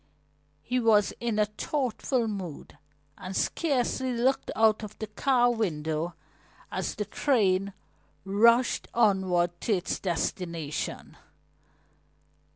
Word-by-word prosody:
He 250 +1 0
was 220 -3 +3
in 235 -3 -1
a 210 - +4
thoughtful 245 +2 -1
mood 190 -8 -6 0.4
and 185 +1 -6
scarcely 260 -4 0
looked 255 +3 +1
out 220 -1 +4
of 215 -1 -8
the 220 - -4
car 245 +3 +2
window 165 -6 -2 0.6
as 185 -2 -3
the 210 - -3
train 200 -9 +1 0.5
rushed 230 +5 +3
onward 190 -6 +3
to 225 - +1
its 185 -2 -1
destination. 170 -3 -3
210 Hz, 105 wpm, -28 LUFS, 185-240 Hz, 0.6 s, a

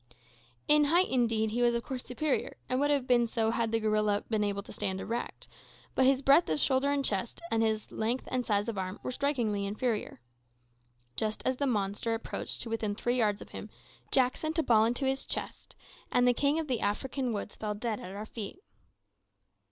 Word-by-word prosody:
In 300 0 +6
height, 345 +5 +4
indeed, 225 -4 +1
he 240 +2 -1
was 240 -1 +4
of 235 - -1
course 255 -2 -4
superior, 275 +3 -2
and 255 - 0
would 290 +1 +2
have 285 -3 +2
been 240 -2 +3
so 225 -1 +1
had 230 -1 0
the 225 - +2
gorilla 215 -1 +1
been 215 -2 +1
able 200 -1 -1
to - - -11
stand 190 0 -1
erect, 235 +4 -4 0.5
but 260 - +3
his 270 0 +3
breadth 280 +6 +5
of - - 0
shoulder 270 0 +3
and 285 -1 +1
chest, 205 +3 -1
and 225 0 +2
his 220 -1 0
length 235 +4 -1
and 255 -1 0
size 205 -2 0
of 220 -4 -3
arm, 185 +1 -4
were - - -3
strikingly 245 -7 0
inferior. 210 - -2 1.0
Just 215 -1 -2
as 260 -1 +1
the 280 - 0
monster 210 0 0
approached 225 - -3
to 230 - -6
within 215 -2 -1
three 240 +3 0
yards 210 -3 +1
of - - -18
him, - - -8 0.4
Jack 255 -1 +3
sent 315 +1 -3
a 325 - +3
ball 220 -4 +5
into 245 +4 -1
its 270 0 -1
chest, - - -4 0.4
and 245 0 +4
the 245 - +5
king 285 +4 +2
of 320 -1 -2
the 250 -4 0
African 255 +5 -1
woods 205 -1 -4
fell 210 -1 -3
dead 215 0 -3
at 185 +2 -8
our 210 +1 -5
feet! 220 - -6
235 Hz, 205 wpm, -30 LUFS, 215-265 Hz, 1.0 s, In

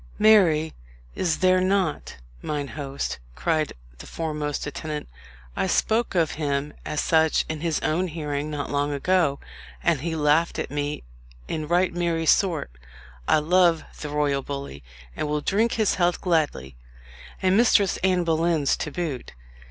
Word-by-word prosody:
"Marry, 175 -8 +5 0.4
is 170 -4 0
there 185 0 +4
not, 185 -5 0 0.3
mine 145 -2 -3
host;" 140 - -4 0.2
cried 155 - 0 0.3
the - - -10
foremost 150 -3 -3
attendant. 150 +1 -5 0.5
"I - - 0
spoke 225 -1 +1
of 165 -3 +2
him 145 0 -1
as 150 - -3
such 160 -1 +3
in 155 -1 -4
his 165 -2 0
own 175 +4 0
hearing 150 -2 -3
not 145 -2 -4
long 145 0 0
ago, 145 -1 +1 0.4
and 135 - +2
he 165 +1 -2
laughed 155 +2 +2
at - - -4
me 145 0 -3 0.4
in 155 -1 -3
right 175 +2 +2
merry 170 -2 -1
sort. 165 - +2 0.6
I - - +5
love 170 +1 +3 0.2
the 150 - -5
royal 145 -2 0
bully, 140 - -6 0.3
and - - -2
will 150 0 0
drink 220 +8 +1
his 220 -3 +2
health 175 0 +2
gladly, 150 - 0 0.6
and 185 0 +2
Mistress 205 -4 +4
Anne 185 -1 +1
Boleyn's 165 -3 +1
to - - -3
boot." 150 -5 -4
155 Hz, 150 wpm, -24 LUFS, 145-175 Hz, 0.6 s, Marry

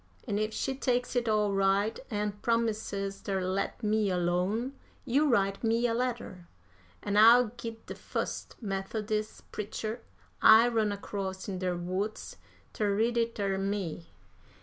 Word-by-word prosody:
An' 205 -2 0
if 215 0 0
she 270 - -2
takes 250 -2 -1
it 240 -2 +1
all 210 -2 +2
right, 195 +2 +2
an' 210 -2 -1
promises 215 -4 -1
ter 195 -1 -1
let 190 +5 -2
me 215 -1 +2
alone, 180 +8 0 0.3
you 285 +4 +3
write 195 -4 +1
me 230 +1 +2
a 235 - +2
letter, 230 -7 -3 0.6
an' 205 0 0
I'll 230 +2 +7
git 230 -1 -8
de - - -6
fust - - -4
Methodis' 215 +2 -3
preacher 215 +2 -4 0.4
I 225 +2 +8
run 220 -3 +1
across 195 -2 -5
in 190 -2 -4
der 180 -1 -1
woods 190 - -4 0.4
ter 205 -2 0
read 230 +3 +1
it 230 0 0
ter 195 -2 -1
me. 195 -4 -3
210 Hz, 150 wpm, -30 LUFS, 195-230 Hz, 0.6 s, I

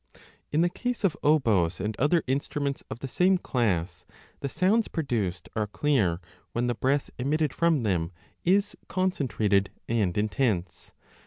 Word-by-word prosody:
In 155 - +2
the 175 - +3
case 245 +5 -3
of 190 -5 +2
oboes 110 - +3
and 105 +3 -2
other 150 +4 +3
instruments 140 +1 -2
of 115 - -7
the 135 - -3
same 180 +9 +3
class, 95 - -1 0.4
the 140 - -3
sounds 205 - +2
produced 110 - -2
are 105 -1 0
clear 105 - +1 0.3
when 120 +1 0
the 120 - +1
breath 135 +4 0
emitted 150 +3 +1
ID - - -15
from 165 -6 +2
them 90 -5 0 0.3
is 200 +3 +2
concentrated 120 - +1 0.2
and 105 -6 0
intense. 105 -4 -1
130 Hz, 150 wpm, -27 LUFS, 105-160 Hz, 0.4 s, the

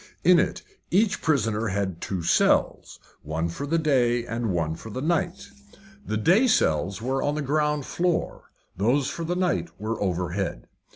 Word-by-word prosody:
In 180 0 +6
it - - -1 0.3
each 200 +3 +2
prisoner 115 -7 +1
had 95 -3 -2
two 95 -4 -3
cells, - - +1 0.2
one 80 +3 -2
for 140 +12 -5
the 165 +3 +1
day 125 -6 +2
and 115 -1 -3
one 85 -4 0
for 110 - -10
the 125 - -5
night. 175 +6 -1 0.5
The 110 - -2
day 190 - +4
cells 95 - +1
were 135 +2 0
on 145 +1 0
the 150 - -2
ground 150 0 0
floor, 175 -1 -2 0.3
those 125 +8 +1
for 170 - -5
the 175 +2 -2
night 180 -1 0
were 110 +1 -3
overhead. 90 -1 -2
120 Hz, 165 wpm, -25 LUFS, 95-160 Hz, 0.5 s, In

